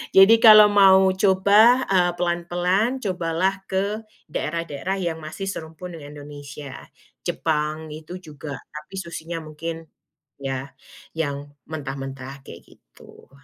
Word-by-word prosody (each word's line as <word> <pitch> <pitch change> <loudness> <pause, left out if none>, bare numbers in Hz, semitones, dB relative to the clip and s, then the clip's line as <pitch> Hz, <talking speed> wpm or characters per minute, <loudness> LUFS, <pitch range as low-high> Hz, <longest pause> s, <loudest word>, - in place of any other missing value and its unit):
jadi 195 +4 +9
kalau 215 -2 +10
mau 190 -2 +6
coba, 205 +6 +5
eee, 180 -2 +3
pelan-pelan, 175 +7 0
cobalah 180 0 0 0.2
ke 205 +3 -2 0.2
daerah-daerah 165 +4 -3
yang 165 -2 -2
masih 160 +6 -6
serumpun 165 +1 -7
dengan 145 -1 -10
Indonesia. 145 -1 -9 0.6
Jepang, 155 0 -2
itu 160 +4 -8
juga, 150 -5 -8 0.2
tapi, 150 +5 -9
susyinya 170 -1 -6
mungkin 165 +2 -6 0.6
ya, 135 0 -4 0.4
yang 145 -2 -3 0.2
mentah-mentah, 135 -2 -6
kayak - - -11
gitu. - - -19
165 Hz, 110 wpm, -23 LUFS, 150-190 Hz, 0.6 s, kalau